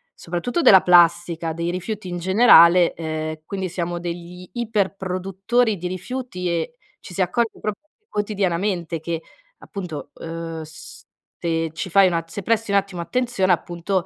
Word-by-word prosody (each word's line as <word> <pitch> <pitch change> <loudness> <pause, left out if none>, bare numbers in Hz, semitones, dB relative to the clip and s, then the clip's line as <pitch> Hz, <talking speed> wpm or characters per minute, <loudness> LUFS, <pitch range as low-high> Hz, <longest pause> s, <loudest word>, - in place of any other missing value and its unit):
soprattutto 175 - -2
della 190 - +8
plastica, 170 -2 +4
dei 170 +1 -2
rifiuti 185 +2 -4
in 175 - -4
generale, 180 -2 +6
ehm, 155 -1 -4
quindi 190 -1 -4
siamo 175 0 -3
degli 175 +1 -7
iper 215 -5 -1
produttori 195 +5 0
di 180 +1 -4
rifiuti 185 -1 -4
e 170 +5 -2 0.3
ci 180 - -11
si 190 - -1
accorge 225 +6 0
proprio 210 +7 -4 0.3
quotidianamente 190 -4 -1
che 165 +1 -4 0.4
appunto, 170 -8 -7
uhm, 165 -1 -6
se 165 +1 -6
ci 175 +3 -5
fai 195 +2 +6
una 170 -2 0
se 165 +5 -7
presti 225 +1 0
un 200 - +4
attimo 195 -3 -2
attenzione, 235 -2 0
appunto 175 +2 -1
180 Hz, 145 wpm, -22 LUFS, 170-200 Hz, 0.4 s, della